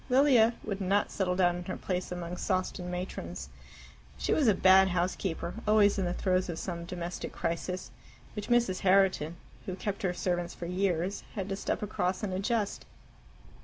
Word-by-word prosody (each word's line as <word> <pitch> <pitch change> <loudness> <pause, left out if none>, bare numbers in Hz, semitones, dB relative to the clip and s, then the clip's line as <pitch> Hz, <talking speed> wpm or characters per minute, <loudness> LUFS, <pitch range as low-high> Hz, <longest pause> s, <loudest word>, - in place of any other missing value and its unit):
Lilia 250 -3 +5
would 200 -2 -4
not 195 +2 +1
settle 180 -2 0
down 175 -1 +3
in 175 - -7
her 185 - -4
place 180 -1 -3
among 175 0 -4
Sawston 185 -1 -2
matrons. 180 +1 -5 0.7
She - - 0
was 295 -5 +3
a 210 - +5
bad 190 +1 +6
housekeeper, 180 -1 -1
always 210 -1 +5
in 190 - 0
the 175 - -1
throes 185 -1 +1
of 165 - -3
some 170 -2 -4
domestic 175 0 -5
crisis, 180 +2 -3 0.4
which 210 -1 -4
Mrs. 235 -6 +3
Herriton, 185 -4 +3 0.3
who 185 - -3
kept 200 +1 -4
her 185 - +1
servants 175 -1 -1
for 175 - -6
years, 180 +1 0
had 195 -3 -3
to 195 - -1
step 200 - -2
across 190 -2 -1
and 195 -3 -2
adjust. 205 +2 -1
185 Hz, 170 wpm, -30 LUFS, 180-200 Hz, 0.7 s, bad